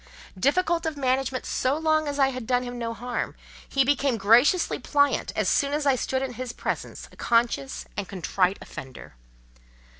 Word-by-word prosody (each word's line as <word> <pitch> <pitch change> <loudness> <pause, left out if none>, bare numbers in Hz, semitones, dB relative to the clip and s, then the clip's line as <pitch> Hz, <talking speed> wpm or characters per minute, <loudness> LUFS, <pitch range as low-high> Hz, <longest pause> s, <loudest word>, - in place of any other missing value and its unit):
Difficult 330 - +1
of 310 -2 -3
management 260 -1 0
so 265 +3 0
long 310 -1 +1
as 285 0 -3
I 270 -1 +4
had 255 -4 -6
done 250 -1 +2
him 245 0 -6
no 230 -1 -2
harm, 245 +2 -4 0.3
he 275 - +3
became 275 -2 +1
graciously 235 - +4
pliant 285 -1 +1
as - - 0
soon 280 -1 +2
as 295 0 -1
I 275 -2 +4
stood 260 +1 -1
in 260 -2 -4
his 245 0 -5
presence - - -4
a - - -17
conscious 230 - 0
and 200 -2 -4
contrite 190 0 0
offender. 135 -6 -10
255 Hz, 175 wpm, -26 LUFS, 230-285 Hz, 0.3 s, I